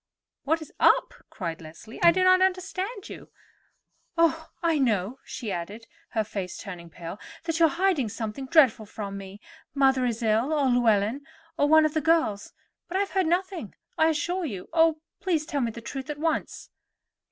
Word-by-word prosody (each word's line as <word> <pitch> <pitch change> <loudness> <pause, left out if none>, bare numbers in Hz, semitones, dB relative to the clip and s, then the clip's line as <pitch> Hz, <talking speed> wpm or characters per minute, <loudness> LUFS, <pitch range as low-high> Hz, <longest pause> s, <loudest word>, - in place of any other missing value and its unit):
"What 320 +2 +1
is - - -15
up!" - - +4 0.2
cried 170 -3 -5
Leslie. 165 +8 -11
"I 340 - +8
do 370 +2 +1
not 370 0 +6
understand 380 +3 -1
you. - - -10 0.9
Oh, 325 -1 +2
I 330 -3 +2
know," 225 -1 0
she 225 -5 -5
added, 200 +6 -5 0.3
her 220 - +3
face 195 -3 -5
turning 175 -4 -8
pale, 170 +4 -8 0.2
"that 330 0 -2
you 330 - +7
are - - -1
hiding 340 - +1
something 225 +4 -5
dreadful 260 -8 +4
from 200 -1 -6
me. 195 0 -9 0.4
Mother 265 -2 +3
is 230 0 -3
ill, 225 +7 +2
or 290 -3 +2
Llewellyn, 235 +1 +2 0.3
or 290 -3 +2
one 315 0 +7
of 305 - 0
the 315 - 0
girls; 320 -11 +1 0.4
but 370 - -2
I - - +2
have 400 - -2
heard 375 -3 +1
nothing, 350 - -2 0.2
I 320 - +4
assure 350 +4 -1
you. 200 - -5
Oh, 325 -1 +4 0.2
please, 330 -5 0
tell 290 -3 -2
me 235 - 0
the 230 +1 -8
truth 270 +4 -6
at 300 - -4
once." 320 +1 -2
280 Hz, 185 wpm, -26 LUFS, 215-330 Hz, 0.9 s, I